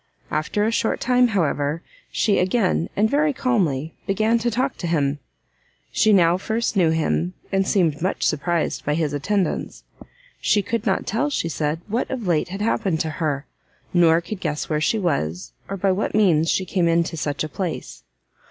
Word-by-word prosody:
After 155 +7 0
a 225 - +1
short 225 0 0
time, 250 0 +3
however, 155 -6 0 0.3
she 210 -3 +2
again, 185 -2 +1
and 210 +2 +3
very 295 +4 +2
calmly, 170 - 0
began 215 +4 +2
to 240 +1 0
talk 255 +4 -1
to 175 - -4
him. 145 -3 0 0.7
She 215 - +3
now 175 -3 +5
first 220 +4 -2
knew 175 -4 +4
him, 90 - 0 0.2
and 195 0 +1
seemed 165 -8 +1
much 185 - -1
surprised 165 +2 0
by 150 - 0
his 155 -3 -1
attendance. 190 +7 -1 0.6
She 205 - +2
could 230 +2 -2
not 190 - +1
tell, 230 +8 0
she 165 -12 -1
said, 155 0 -2
what 225 +4 -1
of 250 -5 -4
late 170 -3 +1
had 195 +3 -6
happened 195 -6 0
to 160 - -1
her, 145 -2 -1 0.5
nor 170 -1 +5
could 195 +3 -6
guess 150 -4 -2
where 155 -1 0
she 220 - +2
was, 95 - -2 0.2
or 195 - -3
by 195 +1 +2
what 195 +3 -1
means 165 -7 +3
she 185 - +1
came 180 -3 +1
into 170 0 +1
such 150 -2 -2
a - - -2
place. 155 - -5
180 Hz, 180 wpm, -22 LUFS, 155-215 Hz, 0.7 s, now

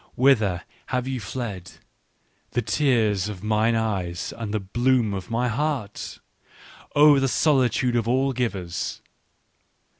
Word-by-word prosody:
" - - -30
Whither 105 -10 +3 0.2
have 125 0 -1
ye 130 -1 -2
fled, 100 -4 -6 0.8
the 120 - 0
tears 110 -9 +1
of 100 -2 -8
mine 110 +2 +2
eyes 95 -6 -2
and 115 -3 -5
the 110 - 0
bloom 120 +2 +1
of 95 -2 -5
my 120 +2 0
heart? 125 -3 -3 0.8
Oh, 145 -1 +7
the 135 - +2
solitude 130 -3 +2
of 115 -2 0
all 130 +2 +2
givers 95 -9 -3
115 Hz, 130 wpm, -24 LUFS, 100-130 Hz, 0.8 s, Oh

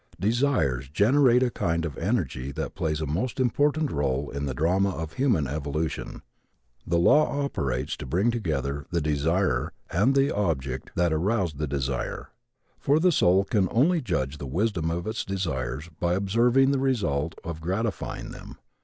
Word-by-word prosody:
Desires 105 - +1
generate 125 - +4
a 125 - +1
kind 85 -4 -1
of 75 -5 -5
energy 65 +2 -2
that - - -4
plays 75 -1 -2
a - - -1
most 95 - -2
important 145 +4 +1
role 70 -1 -1
in 70 0 -3
the 65 - -2
drama 90 +7 +2
of 80 -4 -5
human 120 - +2
evolution. 75 +3 -3 0.6
The 85 - +2
law 145 - +4
operates 70 - -2
to - - -7
bring 95 - +2
together 70 - -2
the 85 - 0
desirer 80 +5 0 0.2
and 110 +10 +3
the 135 +1 +2
object 65 -10 -2
that 85 -2 +2
aroused 90 -2 0
the 75 - -1
desire. 70 -2 -3 0.5
For 145 +3 +3
the 180 +2 +4
soul 95 - +4
can 100 -1 +1
only 160 +8 +3
judge 75 - -2
the 70 - -5
wisdom 85 - 0
of 85 +2 -3
its 110 +1 -2
desires 75 -7 -3
by 85 0 +1
observing 120 +7 +3
the 140 - +1
result 100 - 0
of 80 -1 -6
gratifying 95 +2 -3
them. - - -10
85 Hz, 160 wpm, -26 LUFS, 75-115 Hz, 0.6 s, generate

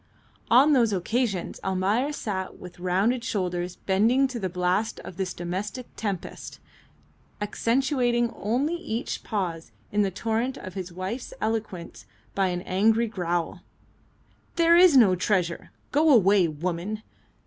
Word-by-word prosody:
On 275 +6 +6
those 235 -5 +4
occasions 200 0 -1
Almayer 195 +9 +1
sat 195 -9 -4
with 180 -1 -11
rounded 195 +7 +1
shoulders 180 -4 -2
bending 225 +10 +2
to 250 -2 -5
the 190 -3 -2
blast 180 +4 0
of - - -9
this 190 -2 -2
domestic 190 +8 -4
tempest, 200 -5 -5 0.8
accentuating 240 +2 +1
only 255 - 0
each 245 -9 -4
pause 175 - -3 0.2
in 210 - +2
the 200 - +2
torrent 225 +6 -2
of 185 - -8
his 185 -2 -6
wife's 190 +8 -5
eloquence 215 -6 -4 0.3
by 195 -1 +1
an 180 -1 -2
angry 220 +5 +2
growl, 175 -6 -2 0.9
"There 335 0 +5
is 350 -5 +7
no 210 -7 +6
treasure! 180 -2 0 0.2
Go 310 +2 +3
away, 200 - +5
woman!" 175 +7 -4
205 Hz, 130 wpm, -26 LUFS, 185-240 Hz, 0.9 s, is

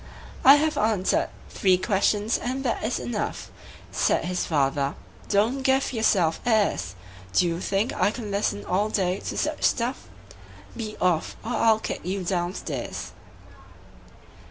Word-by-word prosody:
"I 275 +2 +10
have 305 +1 +1
answered 210 -3 +1 0.2
three 185 -2 +3
questions, 205 +3 +1
and 260 +2 -3
that 245 - -1
is 225 +3 0
enough," 215 -4 -4 0.4
Said - - +1
his 180 0 -2
father. 140 -2 +1 0.3
"Don't 220 +7 +2
give 265 0 +2
yourself 190 -8 +2
airs! 205 - +1 0.4
Do 180 - +4
you 170 0 -1
think 200 +6 0
I - - +2
can 215 -2 -6
listen 100 - -1
all 200 +4 +1
day 185 -3 0
to - - -5
such 305 0 -1
stuff? 245 +2 0 0.7
Be 215 -2 -6
off, 175 -3 +1
or 230 - -3
I'll 225 -2 +4
kick - - -4
you 190 +2 -3
down 175 0 -1
stairs. - - -5
205 Hz, 145 wpm, -25 LUFS, 180-235 Hz, 0.7 s, I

